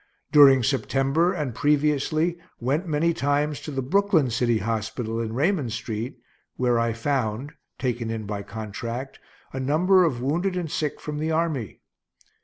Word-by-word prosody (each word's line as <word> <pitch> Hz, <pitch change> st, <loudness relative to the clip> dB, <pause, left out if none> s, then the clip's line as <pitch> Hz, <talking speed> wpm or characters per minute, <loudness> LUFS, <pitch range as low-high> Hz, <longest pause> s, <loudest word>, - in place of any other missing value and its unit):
During 135 Hz, -4 st, +7 dB
September, 135 Hz, +6 st, +1 dB
and 150 Hz, -9 st, -3 dB
previously, 150 Hz, +4 st, +1 dB, 0.2 s
went 145 Hz, +9 st, -1 dB
many 165 Hz, +2 st, +1 dB
times 145 Hz, 0 st, 0 dB
to 150 Hz, -, -7 dB
the 135 Hz, -2 st, -2 dB
Brooklyn 180 Hz, -, +2 dB
city 120 Hz, 0 st, +2 dB
hospital, 110 Hz, +1 st, -2 dB
in 110 Hz, -1 st, -3 dB
Raymond 145 Hz, -, 0 dB
street, 115 Hz, +1 st, -4 dB, 0.4 s
where 120 Hz, -2 st, +2 dB
I 115 Hz, 0 st, +1 dB
found 115 Hz, +1 st, -2 dB, 0.3 s
(taken 120 Hz, -3 st, -2 dB
in 110 Hz, -1 st, -4 dB
by 100 Hz, 0 st, -4 dB
contract) 115 Hz, +5 st, -6 dB, 0.3 s
a 130 Hz, -, -3 dB
number 175 Hz, +8 st, +4 dB
of 140 Hz, -8 st, 0 dB
wounded 175 Hz, +9 st, 0 dB
and 170 Hz, -4 st, -3 dB
sick 150 Hz, -2 st, -2 dB
from 150 Hz, -1 st, -5 dB
the 155 Hz, +1 st, -1 dB
army. 155 Hz, -, -1 dB
135 Hz, 150 wpm, -25 LUFS, 115-155 Hz, 0.4 s, During